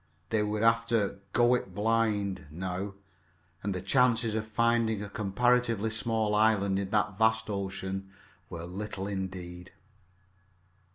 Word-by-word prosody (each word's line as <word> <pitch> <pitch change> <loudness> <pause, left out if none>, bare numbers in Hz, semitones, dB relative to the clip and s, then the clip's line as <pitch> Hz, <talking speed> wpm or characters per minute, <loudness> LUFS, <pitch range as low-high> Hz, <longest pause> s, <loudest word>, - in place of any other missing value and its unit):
They 110 -1 +2
would 105 +1 -1
have 115 0 +4
to 105 -4 0
"go 120 +3 +4
it 95 -7 -2
blind" 105 -5 0
now, 95 +4 -4 0.7
and 100 - -2
the 90 -1 -4
chances 120 -4 +3
of 110 0 -2
finding 115 -1 +1
a 100 - -6
comparatively 115 +1 +1
small 110 -1 0
island 105 -2 +3
in 100 -1 -3
that 105 -1 0
vast 110 -1 +2
ocean 95 -1 -4 0.4
were 85 -1 -6
little 95 +2 -5
indeed. 95 -2 -5
105 Hz, 130 wpm, -29 LUFS, 95-115 Hz, 0.7 s, have